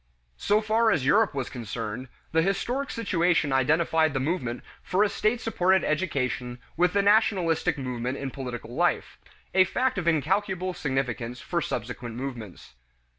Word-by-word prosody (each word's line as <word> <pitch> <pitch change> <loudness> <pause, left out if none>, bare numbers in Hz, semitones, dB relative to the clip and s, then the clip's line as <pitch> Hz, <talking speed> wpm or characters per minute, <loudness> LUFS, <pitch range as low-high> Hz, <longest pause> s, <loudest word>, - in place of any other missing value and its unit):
So 210 +1 +2
far 220 +1 +2
as 160 -11 +1
Europe 200 +4 +3
was 135 -3 -2
concerned, 115 +1 -5 0.2
the 160 - +3
historic 240 +9 -1
situation 175 -9 +1
identified 155 +3 +2
the - - +1
movement 130 -5 -2 0.2
for 190 +3 +1
a 210 - +2
state 220 +4 0
supported 190 -5 +2
education 125 -7 -1 0.2
with 180 +2 +2
the 200 0 +2
nationalistic 195 -7 +3
movement 125 -1 -3
in 135 -1 -4
political 125 -3 -6
life - - 0 0.3
a 185 - +6
fact 250 +4 0
of 170 - -4
incalculable 185 +3 +1
significance 125 -5 -2
for 170 -1 -2
subsequent 120 -2 -4
movements. 120 - -7
160 Hz, 145 wpm, -26 LUFS, 125-190 Hz, 0.3 s, a